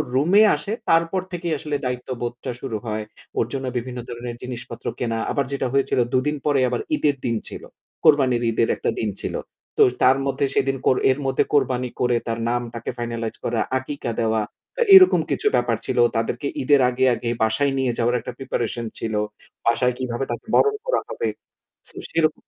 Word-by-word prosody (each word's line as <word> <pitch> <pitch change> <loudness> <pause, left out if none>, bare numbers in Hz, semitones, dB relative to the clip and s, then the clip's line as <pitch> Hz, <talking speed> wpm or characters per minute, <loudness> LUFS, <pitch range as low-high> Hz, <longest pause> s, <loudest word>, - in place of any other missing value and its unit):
রুমে 175 +10 +5
আসে, 150 +8 -5 0.2
তারপর 165 +3 +3
থেকেই 170 -2 -2
আসলে 150 0 -3
দায়িত্ববোধটা 125 -1 -4
শুরু 115 -5 -3
হয়। 110 -1 -2 0.4
ওর - - +3
জন্য 135 -1 -3
বিভিন্ন 125 +1 -4
ধরনের 120 0 -6
জিনিসপত্র 125 -1 -7
কেনা। 115 -2 -1
আবার 140 - 0
যেটা 140 -2 -1
হয়েছিল 135 -1 +2
দুদিন 150 +4 +1
পরে 145 -2 +3
আবার 125 - -1
ঈদের 145 - +1
দিন 115 -1 +1
ছিল। - - -8 0.4
কোরবানির 130 -5 +4
ঈদের 115 0 +2
একটা - - -2
দিন 110 - 0
ছিল। - - -3 0.4
তো - - +7 0.2
তার 130 +1 +6
মধ্যে 140 +1 0
সেদিন 135 0 +1
কোর 130 - +4
এর 135 - -1
মধ্যে 135 -1 +2
কোরবানি 125 -3 +2
করে, 125 -1 +2
তার 115 0 -2
নামটাকে 120 -1 -3
finalize 115 -1 -3
করা, 115 -2 0 0.2
আকিকা 130 -2 -4
দেওয়া। 110 -1 +1 0.3
তো - - -3
এরকম 370 -1 +8
কিছু 425 - 0
ব্যাপার - - +1
ছিল। - - -2 0.2
তাদেরকে - - -1
ঈদের 145 -2 +4
আগে, 130 +1 +1
আগে 115 - -4
বাসায় 110 +6 +2
নিয়ে 130 -2 +1
যাওয়ার 120 +1 +2
একটা 125 - -6
প্রিপারেশন 120 -3 -3
ছিল। 110 -1 -3 0.5
বাসায় 125 +2 +3
কিভাবে 125 0 -2
তাকে 120 - -5
বরণ 425 0 +4
করা - - +2
হবে। 465 - -2 0.6
সো - - -14
সেইরক 160 -1 +2
125 Hz, 175 wpm, -23 LUFS, 120-140 Hz, 0.6 s, এরকম